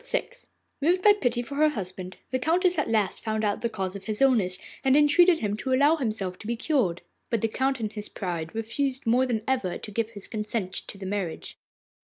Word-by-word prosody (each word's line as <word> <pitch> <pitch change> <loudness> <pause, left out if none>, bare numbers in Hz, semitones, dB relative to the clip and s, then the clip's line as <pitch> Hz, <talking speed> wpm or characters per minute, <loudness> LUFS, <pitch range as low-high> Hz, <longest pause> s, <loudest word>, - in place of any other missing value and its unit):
VI - - -1 0.5
Moved 355 +5 +2
by 420 - +8
pity 245 - 0
for 280 - -8
her 305 +1 +5
husband, 185 -7 -6
the 260 - 0
Countess 350 +4 +2
at 295 - -1
last 215 -3 +1
found 220 -1 -2
out 205 -1 0
the 235 - 0
cause 190 -3 -3
of 195 -1 -8
his 215 -1 -2
illness, 220 -10 +3 0.3
and 270 +1 +5
entreated 320 +4 +6
him 205 -1 0
to 260 +3 -1
allow 285 +5 +5
himself 215 - -2
to 210 - -9
be 235 - 0
cured. 230 - 0 0.3
But 230 -3 0
the 225 - +2
Count 265 +3 0
in 215 -2 -3
his 210 -1 -6
pride 175 -1 -4
refused 255 +4 -2
more 250 +3 +3
than 225 -4 -1
ever 250 -9 0
to 210 - -9
give 225 +1 -1
his 205 -4 -7
consent 210 -3 -3
to - - -6
the 195 - -8
marriage. 190 -4 -4
225 Hz, 220 wpm, -26 LUFS, 200-270 Hz, 0.5 s, by